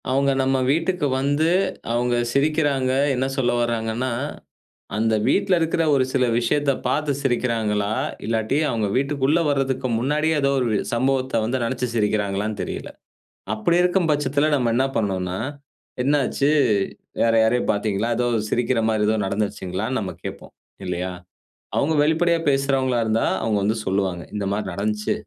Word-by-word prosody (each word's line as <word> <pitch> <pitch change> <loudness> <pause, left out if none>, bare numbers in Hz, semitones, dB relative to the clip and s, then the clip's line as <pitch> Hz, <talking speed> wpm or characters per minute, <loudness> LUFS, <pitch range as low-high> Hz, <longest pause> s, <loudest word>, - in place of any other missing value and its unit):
அவுங்க 140 +1 +2
நம்ம 135 0 +1
வீட்டுக்கு 165 0 0
வந்து, 145 +4 +1 0.4
அவுங்க 120 +1 +1 0.2
சிரிக்கிறாங்க, 140 -2 +1 0.2
என்ன 130 +1 0
சொல்ல 130 -2 +2
வராங்கன்னா, 120 +1 -1 0.8
அந்த 110 0 +2
வீட்ல 195 -1 +2
இருக்கிற 165 0 +1
ஒரு 135 -2 +3
சில 130 -2 +2 0.2
விஷயத்த 140 +4 +1 0.2
பார்த்து 145 +3 0
சிரிக்கிறாங்களா? 115 -5 0 0.3
இல்லாட்டி, 110 +4 0
அவங்க 110 -3 0
வீட்டுக்குள்ள 140 +3 +1
வரதுக்கு 135 -2 0
முன்னாடியே 150 +5 +1
ஏதோ 140 0 +2
ஒரு 120 -4 0 0.2
சம்பவத்த 130 -1 +1
வந்து 125 +3 -1
நெனச்சு 125 +2 -1
சிரிக்கிறாங்களான்னு 105 -1 0
தெரியல. - - -6 0.6
அப்படி 110 +11 +1
இருக்கும் 180 -1 +2
பட்சத்தில 145 +1 +1
நம்ம 125 -4 +1
என்னா 130 +3 +2
பண்ணனும்னா, 95 -3 -1 0.6
என்னாச்சு 140 +1 +1 0.7
வேற 115 - +3
யாரையோ 115 +2 +2
பார்த்தீங்களா? 105 +1 -1
ஏதோ 125 - +1 0.2
சிரிக்கிற 120 +1 0
மாரி 110 -1 +1
ஏதோ 110 - +2
நடந்துருச்சுங்களான்னு 100 +3 -2
நம்ம 95 -3 -4
கேட்போம், - - -8 0.3
இல்லையா? 90 +1 -3 0.7
அவங்க 155 +3 +2
வெளிப்படையா 165 +2 +2
பேசுறவங்களா 135 -2 +1
இருந்தா, 110 +1 +1 0.2
அவங்க 110 -2 +1
வந்து 110 +3 +1
சொல்லுவாங்க. 95 -2 -1
"இந்த 105 -1 -2
மாரி 105 +1 -2
நடந்துச்சு, 105 +3 -1
125 Hz, 135 wpm, -22 LUFS, 110-140 Hz, 0.8 s, ஒரு